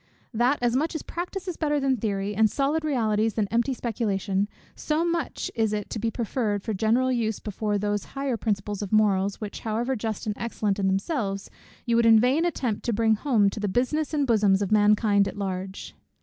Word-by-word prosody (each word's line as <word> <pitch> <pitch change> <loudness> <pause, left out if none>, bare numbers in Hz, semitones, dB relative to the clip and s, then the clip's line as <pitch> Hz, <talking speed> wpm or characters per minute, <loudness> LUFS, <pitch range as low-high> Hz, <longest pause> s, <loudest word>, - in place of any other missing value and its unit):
That, 245 +5 +2
as 240 0 +2
much 310 +5 0
as 315 - -3
practice 365 +2 -5
is 360 - -4
better 295 -2 +1
than 270 -1 +2
theory, 205 -3 -2
and 220 +1 +4
solid 285 +6 0
realties 225 -7 0
than 215 -3 +1
empty 235 +4 +1
speculation, 205 -4 -1 0.3
so 315 +2 0
much 340 -1 -2
is 220 -2 0
it 210 -1 -4
to 225 - -3
be 225 +2 0
preferred 220 -3 -2
for 220 - -2
general 230 +6 +2
use 225 -4 0
before 210 0 -2
those 205 0 -1
higher 275 -2 -1
principles 205 -2 -2
of 205 - -5
morals, 200 -2 +2
which 210 -2 -6
however 230 +4 -1
just 220 -1 -4
and 210 -1 -2
excellent 210 -3 -1
in 195 - +1
themselves, 195 - -2 0.3
you 235 - +1
would 235 0 +4
in 225 -1 +7
vain 265 +8 +2
attempt 255 -10 -2
to 235 - 0
bring 220 +1 +3
home 220 -3 +2
to 215 - -6
the 210 - -1
'business 260 +9 0
and 295 -2 +1
bosoms 205 -5 +3
of 200 - -4
mankind' 210 -1 +4
at - - -6
large. 190 -1 -5
220 Hz, 205 wpm, -26 LUFS, 205-255 Hz, 0.3 s, in